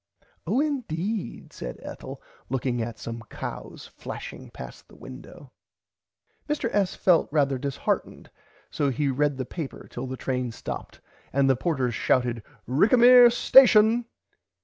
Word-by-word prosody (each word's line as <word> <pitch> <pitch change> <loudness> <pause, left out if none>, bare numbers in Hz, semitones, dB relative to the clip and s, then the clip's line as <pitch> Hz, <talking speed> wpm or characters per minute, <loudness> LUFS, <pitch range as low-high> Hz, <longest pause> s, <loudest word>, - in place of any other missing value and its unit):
Oh 255 - +1
indeed 220 - -3
said - - -7
Ethel - - -9 0.3
looking 125 -2 -1
at 115 0 -5
some 115 0 -7
cows - - -7
flashing - - -9
past 65 0 -11
the - - -18
window. 125 - -12 1.0
Mr. 285 -6 -2
S. 200 -2 +1
felt 175 -6 +2
rarther 140 -4 +1
disheartened 140 -2 -3 0.4
so 145 - 0
he 140 +2 -1
read 145 +1 0
the 130 - -3
paper 155 0 -7
till 125 +2 -5
the 130 0 -6
train 125 -2 -2
stopped - - -8 0.3
and 135 0 +2
the 135 - +4
porters 130 -4 -1
shouted 120 0 0 0.3
Rickamere 240 - +7
station. 235 -2 +5
140 Hz, 130 wpm, -25 LUFS, 125-210 Hz, 1.0 s, Rickamere